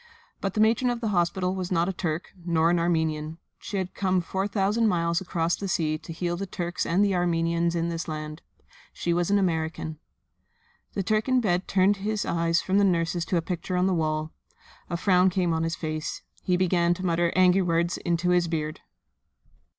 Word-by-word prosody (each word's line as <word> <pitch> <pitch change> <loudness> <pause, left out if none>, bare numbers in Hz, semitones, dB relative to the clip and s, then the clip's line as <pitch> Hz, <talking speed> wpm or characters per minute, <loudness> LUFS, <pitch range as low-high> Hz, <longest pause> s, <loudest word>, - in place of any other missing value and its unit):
But 195 -1 -3
the - - 0
matron 230 +3 +3
of 240 -1 -1
the 225 -2 -2
hospital 180 0 +1
was 185 -1 -4
not 170 -1 +2
a 195 - -1
Turk, 165 -2 -3
nor 170 -1 +2
an 175 - +2
Armenian. 160 -2 0 0.2
She 200 - -5
had 185 -1 -3
come 185 -2 +1
four 190 +3 -2
thousand 205 +3 +1
miles 170 -3 +1
across 170 -2 0
the 200 - -5
sea 155 -4 0
to 165 - -10
heal 175 +1 -2
the 195 +3 -4
Turks 175 -1 -3
and 190 +5 +3
the 200 - +1
Armenians 170 -1 +1
in 170 0 0
this 170 0 -4
land. 155 0 -5 0.5
She 170 - -1
was 175 +1 0
an 205 - +4
American. 160 -4 -1 0.9
The 195 - -1
Turk 215 +5 0
in 255 0 +4
bed 185 -5 0
turned 195 +1 +3
his 210 +1 -2
eyes 165 0 +1
from 190 +1 +2
the - - +4
nurses 170 -2 +1
to 180 - 0
a 165 - 0
picture 180 +1 -3
on 180 - +2
the 190 - +2
wall. 155 -1 -1 0.6
A 170 - -1
frown 185 0 +4
came 180 -2 0
on 160 - 0
his 165 0 -1
face. 155 -1 -4 0.2
He 180 -1 +1
began 175 -1 +2
to 185 +1 -5
mutter 170 -1 +1
angry 185 +1 +5
words 170 0 +1
into 175 +1 0
his 175 -1 +3
beard. 155 -2 -3
175 Hz, 205 wpm, -26 LUFS, 165-190 Hz, 0.9 s, angry